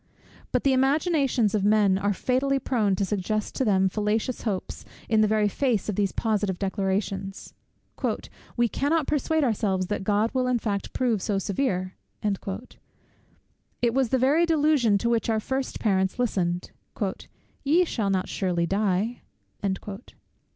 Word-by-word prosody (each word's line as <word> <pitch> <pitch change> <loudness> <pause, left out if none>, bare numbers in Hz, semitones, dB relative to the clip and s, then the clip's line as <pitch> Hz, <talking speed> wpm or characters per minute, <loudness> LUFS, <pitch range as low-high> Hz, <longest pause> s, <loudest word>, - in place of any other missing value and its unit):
But - - +1
the 275 - +4
imaginations 270 - +2
of 210 -3 +1
men 205 -2 +4
are 205 +1 +1
fatally 260 +6 +1
prone 225 -7 +1
to 195 - 0
suggest 210 +2 -2
to 265 - 0
them 190 -4 +3
fallacious 215 +5 -1
hopes 200 -5 -3 0.2
in 220 -2 +3
the 215 - +4
very 215 0 +2
face 225 -1 0
of 210 - -1
these 200 -1 +1
positive 205 -4 0
declarations. 195 0 -2 1.0
"We 240 0 +4
cannot 290 +6 0
persuade 305 +2 +1
ourselves 200 -6 +1
that 205 -2 -2
God 210 +3 +1
will 255 -1 +1
in 250 -1 +2
fact 205 -3 -3
prove 235 -6 +1
so 200 +1 0
severe." 190 -2 -1 0.3
It 210 +3 -6
was 265 -2 +2
the 260 - +2
very 290 +7 +3
delusion 295 -9 +3
to 235 - -1
which 230 0 +1
our 220 -1 +2
first 265 +4 -3
parents 190 -2 +1
listened; 180 -8 -1 0.9
"Ye 325 +6 +4
shall 220 -10 -1
not 190 -1 0
surely 175 -3 0
die." 200 +4 0
215 Hz, 145 wpm, -26 LUFS, 195-255 Hz, 1.0 s, the